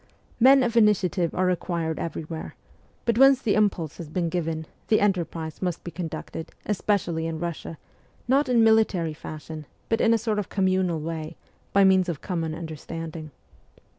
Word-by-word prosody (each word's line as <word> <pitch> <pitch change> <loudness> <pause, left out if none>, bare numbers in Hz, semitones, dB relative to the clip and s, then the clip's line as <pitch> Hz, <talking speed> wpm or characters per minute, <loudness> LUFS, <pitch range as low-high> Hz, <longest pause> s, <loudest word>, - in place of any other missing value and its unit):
Men 265 +2 +7
of 235 -2 -1
initiative 190 -6 +3
are 185 - +2
required 170 -3 -1
everywhere; 160 -1 -5 0.5
but 235 0 +1
once 270 -1 +7
the 215 -6 +1
impulse 190 -8 +1
has 165 -3 -8
been 170 +1 -1
given, 160 -2 -2 0.2
the 215 - +4
enterprise 170 -5 -1
must 180 -3 -2
be 175 - -6
conducted, 165 -1 -6
especially 185 -5 0
in 165 -1 -3
Bussia, 165 -1 -5 0.5
not 270 +2 +3
in 235 -2 +4
military 215 -8 +3
fashion, 155 0 -8 0.2
but 225 - +1
in 230 - +4
a 230 - +5
sort 220 -1 -1
of 205 - -4
communal 185 -3 +1
way, 160 0 -5 0.3
by 200 - +5
means 190 -1 +4
of 160 -5 -3
common 165 -4 -3
understanding. 160 0 -7
175 Hz, 160 wpm, -25 LUFS, 160-210 Hz, 0.5 s, Men